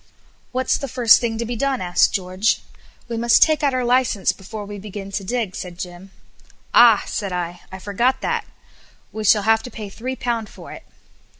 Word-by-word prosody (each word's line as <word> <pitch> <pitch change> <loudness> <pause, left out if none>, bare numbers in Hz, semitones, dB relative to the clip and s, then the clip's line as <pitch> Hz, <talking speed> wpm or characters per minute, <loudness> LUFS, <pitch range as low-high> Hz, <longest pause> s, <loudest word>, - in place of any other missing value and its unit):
"What's 255 0 0
the 275 - -4
first 240 -3 +5
thing 230 -2 -2
to 235 - -2
be 240 +1 -4
done?" 270 +2 0
asked 175 -1 +2
George. 185 +2 0 0.5
"We 235 -1 -4
must 235 +1 +5
take 310 -1 +2
out 280 -3 +1
our 255 -1 0
licence 240 -6 +2
before 205 +3 -8
we 205 0 -8
begin 195 -1 -8
to 195 - -3
dig," 220 -2 -2
said 180 -2 -7
Jim. 180 +1 -8 0.6
"Ah!" 230 -4 +7
said 200 -2 -4
I; 175 0 -4
"I 190 - -7
forgot 210 +7 0
that! - - -1 0.7
We 215 - -5
shall 210 0 +4
have 220 +1 +3
to 250 - -8
pay 215 -4 -8
three 255 +6 -5
pounds 235 -4 -2
for - - -12
it." - - -11
220 Hz, 195 wpm, -21 LUFS, 195-240 Hz, 0.7 s, Ah